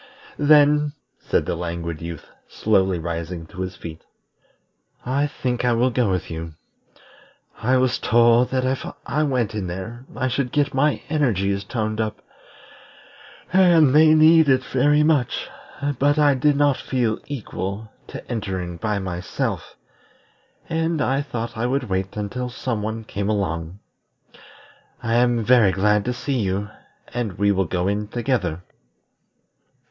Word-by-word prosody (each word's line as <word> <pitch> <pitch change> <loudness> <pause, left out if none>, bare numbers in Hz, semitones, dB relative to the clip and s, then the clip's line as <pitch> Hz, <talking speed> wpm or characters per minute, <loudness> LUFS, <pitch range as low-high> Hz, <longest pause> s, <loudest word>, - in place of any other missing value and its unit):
"Then," 150 0 +5 0.3
said - - 0
the - - -2
Languid 85 -1 -4
Youth, 85 -2 -7 0.2
slowly 95 -4 +1
rising 85 0 -5
to 90 +3 -9
his 95 0 -4
feet, 80 -1 -9 1.0
"I 140 +3 +1
think 125 -4 -3
I 125 -1 +3
will 125 +2 +2
go 120 -3 +1
with 90 -3 -2
you. 80 -1 -6 1.1
I 130 +3 +3
was 130 -1 +1
told 120 +2 +4
that 130 -1 0
if 130 +1 -1 0.2
I 150 - 0
went 125 -7 0
in 105 -4 -3
there 95 +8 -7
I 130 - -1
should 125 0 -1
get 145 -1 +1
my 140 +2 +1
energies 100 - 0
toned 110 0 -2
up, 110 -1 -4 1.3
and 170 -7 +5
they 155 +1 +6
need 160 -1 +6
it 130 -1 +3
very 145 +3 +2
much; 150 -6 +1 0.5
but 145 +2 +3
I 145 -1 +5
did 145 +2 +2
not 145 -2 +3
feel 120 -5 -1
equal 110 -5 -5 0.2
to - - -9
entering 95 -7 -4
by 105 +3 -1
myself, 90 -2 -4 0.9
and 165 0 -1
I 135 0 +1
thought 120 -4 -5
I 115 +2 -1
would 130 -2 -1
wait 95 +2 -2
until 125 +5 -3
some 120 -2 -3
one 110 +1 -4
came 100 -1 -3
along. 90 -4 -2 1.3
I 115 -1 -1
am 120 -1 +3
very 120 -4 +5
glad 105 +2 +2
to 125 - -1
see 130 +1 -2
you, 100 +1 -2 0.4
and 120 -5 -3
we 100 +2 +2
will 95 -1 +1
go 90 +2 -1
in 105 +1 -1
together." 105 - -2
115 Hz, 145 wpm, -22 LUFS, 95-135 Hz, 1.3 s, they